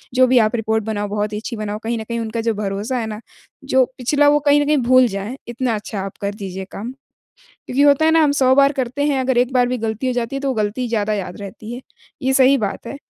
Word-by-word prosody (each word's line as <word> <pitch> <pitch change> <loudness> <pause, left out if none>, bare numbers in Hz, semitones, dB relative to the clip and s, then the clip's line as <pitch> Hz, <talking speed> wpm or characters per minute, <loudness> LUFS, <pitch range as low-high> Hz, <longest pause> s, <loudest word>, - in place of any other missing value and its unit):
जो 255 0 +6
भी 255 0 +3
आप 220 0 +2
रिपोर्ट 220 -1 0
बनाओ 205 -1 -3
बहुत 210 +1 -2
ही - - -2
अच्छी 230 +2 -6
बनाओ। 210 -1 -4
कहीं 230 +1 -2
न - - -5
कहीं 235 +1 -4
उनका 225 0 -3
जो 230 0 0
भरोसा 205 +4 -3
है 230 - -2
ना, 215 -1 -6 0.4
जो 265 -1 +3
पिछला 290 +4 +2
वो 295 0 +4
कहीं 285 0 +6
न - - 0
कहीं 300 +1 +2
भूल 255 0 +4
जाएँ, 200 +4 -5
इतना 240 0 -1
अच्छा 210 0 -5
आप 195 0 -7
कर 200 0 -2
दीजिए 190 -2 -6
काम। 225 +5 -6 0.8
क्योंकि 265 +3 +1
होता 285 +1 +5
है - - +5
ना 325 0 +5
हम 295 -2 +3
100 260 -2 +3
बार 280 +1 +5
करते 265 +1 -2
हैं, 280 -3 +1
अगर 260 -1 +1
एक 250 +1 +1
बार 250 -1 +4
भी 250 0 -2
गलती 220 +2 -3
हो - - +1
जाती 245 +2 -2
है - - -3
तो 275 - -2
वो 265 - 0
गलती 215 +3 -1
ज़्यादा 215 -2 0
याद 190 -3 -5
रहती 215 +3 -8
है। 245 - -7 0.4
ये 265 +1 +1
सही 270 +1 +5
बात 210 0 -4
है, 280 - -6
235 Hz, 270 wpm, -19 LUFS, 215-260 Hz, 0.8 s, जो